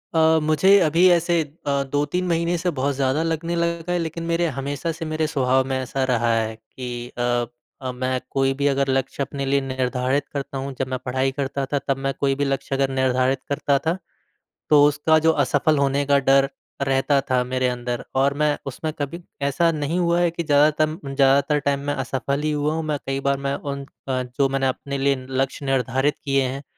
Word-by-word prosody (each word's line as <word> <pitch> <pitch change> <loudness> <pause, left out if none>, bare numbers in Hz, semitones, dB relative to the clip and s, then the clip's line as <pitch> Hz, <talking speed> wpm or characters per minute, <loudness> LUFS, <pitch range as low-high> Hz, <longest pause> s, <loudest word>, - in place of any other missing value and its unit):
अ, 160 0 +5
मुझे 190 +6 +5
अभी 170 +4 +4
ऐसे 170 0 +3 0.3
अ, 140 -1 +1
2-3 150 +6 0
महीने 170 +1 +1
से 180 +2 -1
बहुत 140 0 0
ज़्यादा 135 +3 +1
लगने 165 +1 -2
लगा 170 0 -1
है 180 - +1
लेकिन 165 0 -4
मेरे 170 +1 0
हमेशा 140 +4 -2
से 165 0 -6
मेरे 155 0 0
स्वभाव 130 -3 +2
में 130 -1 -1
ऐसा 130 +1 -2
रहा 120 -1 +2
है 110 0 -1
कि 115 +3 -10 0.3
अ 120 0 +1 0.4
अ, 130 - -3
मैं 130 +1 -2
कोई 135 0 +1
भी 140 - +2
अगर 135 0 0
लक्ष्य 135 +1 0
अपने 140 0 -4
लिए 140 +1 +2
निर्धारित 130 +1 -1
करता 140 -1 -4
हूँ 135 0 -4
जब 130 - -1
मैं 130 -1 -3
पढ़ाई 130 +1 0
करता 140 0 -2
था 140 - +2
तब 135 - +1
मैं 135 - +1
कोई 135 -1 +1
भी 145 0 0
लक्ष्य 135 0 -2
अगर 135 0 +1
निर्धारित 130 0 +1
करता 140 0 +1
था। 165 +3 -1 0.7
तो 145 -1 +7
उसका 150 +2 +3
जो 160 +1 +4
असफल 150 +1 +2
होने 140 0 +1
का 140 0 +4
डर 135 +1 +5 0.3
रहता 135 +1 +2
था 125 -1 +2
मेरे 130 0 0
अंदर 120 0 -3
और 140 +1 +3
मैं 150 -1 +2
उसमें 140 +4 -4
कभी 170 +5 -4 0.3
ऐसा 165 +4 +2
नहीं 155 +3 -2
हुआ 170 0 +2
है 175 -1 +3
कि 170 0 -4
ज़्यादातर 150 0 +2
ज़्यादातर 140 +2 +3
टाइम 140 0 0
मैं - - +1
असफल 140 +2 -2
ही 155 0 0
हुआ 150 +1 0
हूँ 160 0 -2
मैं 150 -1 -1
कई 135 0 -1
बार 140 0 +2
मैं 140 - 0
उन 140 -1 -5 0.2
अ, 130 -1 0
जो 130 +2 0
मैंने 135 -1 0
अपने 140 +2 -3
लिए 140 0 +2
लक्ष्य 135 +1 -2
निर्धारित 135 +2 +1
किए 135 -1 +2
हैं, 135 +2 -4
140 Hz, 205 wpm, -22 LUFS, 135-155 Hz, 0.7 s, तो